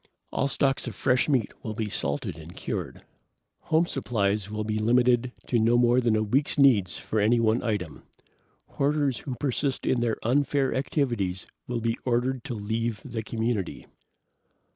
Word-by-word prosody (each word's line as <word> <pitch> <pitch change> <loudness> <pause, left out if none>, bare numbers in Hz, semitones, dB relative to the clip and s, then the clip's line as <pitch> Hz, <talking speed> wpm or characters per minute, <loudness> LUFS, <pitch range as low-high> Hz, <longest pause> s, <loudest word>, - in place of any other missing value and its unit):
"All 140 - 0
stocks 135 -1 +1
of 115 - -5
fresh 125 +5 +2
meat 130 -7 +1
will 110 -1 -5
be 110 -1 -2
salted 70 -8 -2
and 80 +2 -11
cured. - - -5 0.6
Home 160 +2 +2
supplies 105 - -1
will 105 0 -3
be 110 0 -1
limited 120 +2 +3
to 120 - +1
no 115 +2 +4
more 120 +1 +4
than 115 -3 +2
a 110 - +2
week's 135 +7 +1
needs 120 -10 +4
of 110 - -2
any 110 +3 +3
one 115 +1 +2
item. 100 -9 -3 0.6
Hoarders 140 -4 0
who 130 - -5
persist 135 +1 -1
in 130 - +2
their 120 -2 0
unfair 135 +2 +1
activities 120 - -1 0.2
will 120 -1 -2
be 115 0 -1
ordered 125 0 0
to 120 - -4
leave 110 +1 -2
the 120 -4 -4
community. 110 -3 -2
120 Hz, 165 wpm, -27 LUFS, 110-130 Hz, 0.6 s, no